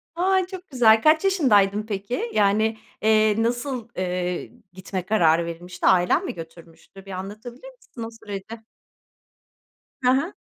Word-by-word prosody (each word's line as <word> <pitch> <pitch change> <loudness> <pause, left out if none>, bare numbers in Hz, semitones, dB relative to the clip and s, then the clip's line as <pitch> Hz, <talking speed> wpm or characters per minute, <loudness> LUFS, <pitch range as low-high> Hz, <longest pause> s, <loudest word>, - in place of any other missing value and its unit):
A! 375 +2 +2
Çok 370 -1 -10
güzel. 225 -5 +5
Kaç 310 +3 +4
yaşındaydın 215 - +3
peki? 215 - -4
Yani, 215 +2 +2 0.2
eee, 215 0 +3
nasıl, 240 0 -2
eee, 180 -1 -3 0.2
gitme 185 0 -5
kararı 170 -5 +3
verilmişti? 175 +1 -7
Ailen 180 -1 +3
mi - - -4
götürmüştü? 165 +3 -13
Bir 195 - -10
anlatabilir 215 - -8
misin 240 - -10
o 225 - -5
süreci? 205 +2 -7 1.4
Hı 250 - +4
hı. 280 +9 0
215 Hz, 130 wpm, -23 LUFS, 185-250 Hz, 1.4 s, güzel